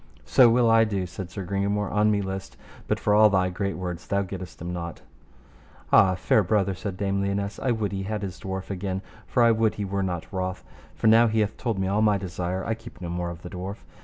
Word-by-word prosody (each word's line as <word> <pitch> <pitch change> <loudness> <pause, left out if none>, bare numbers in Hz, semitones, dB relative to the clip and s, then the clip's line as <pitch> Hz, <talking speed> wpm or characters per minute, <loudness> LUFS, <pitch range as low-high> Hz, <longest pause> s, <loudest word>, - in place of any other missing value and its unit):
So 125 -3 +6
will 120 +1 +4
I 115 0 +6
do, 100 -4 -1
said 90 +1 -7
Sir 95 +1 -6
Gringamore, 100 +2 -1
an 105 +1 +4
me 100 -1 +1
list, 95 0 -6 0.3
but - - 0
for 105 - +1
all 105 +1 +7
thy 95 -2 +2
great 100 +2 -2
words 90 -1 -5
thou 100 0 +1
gettest 95 -1 -8
him 85 +1 -5
not. 85 -1 -6 0.9
Ah! 95 -1 +6
fair 95 +4 +3
brother, 100 0 +1
said 95 0 -5
Dame 100 0 0
Lionesse, 100 +1 -2
I 130 - -1
would 110 -4 0
he 95 -1 -3
had 105 +1 -3
his 95 -3 -5
dwarf 95 0 -5
again, 95 0 -3 0.2
for 125 - +3
I 115 - +6
would 110 -1 +2
he 105 - -3
were 100 +1 -2
not 90 -3 -2
wroth, 95 -1 -3 0.3
for - - -5
now 115 +2 +7
he 110 0 +1
hath 105 -1 -1
told 115 -5 -2
me 95 0 0
all 100 +3 +1
my 105 -2 +4
desire 90 0 -3
I 110 - 0
keep 115 - -11
no 90 -2 -5
more 85 0 -2
of 85 0 -9
the 90 - -7
dwarf. 95 +2 -5
100 Hz, 240 wpm, -26 LUFS, 95-105 Hz, 0.9 s, all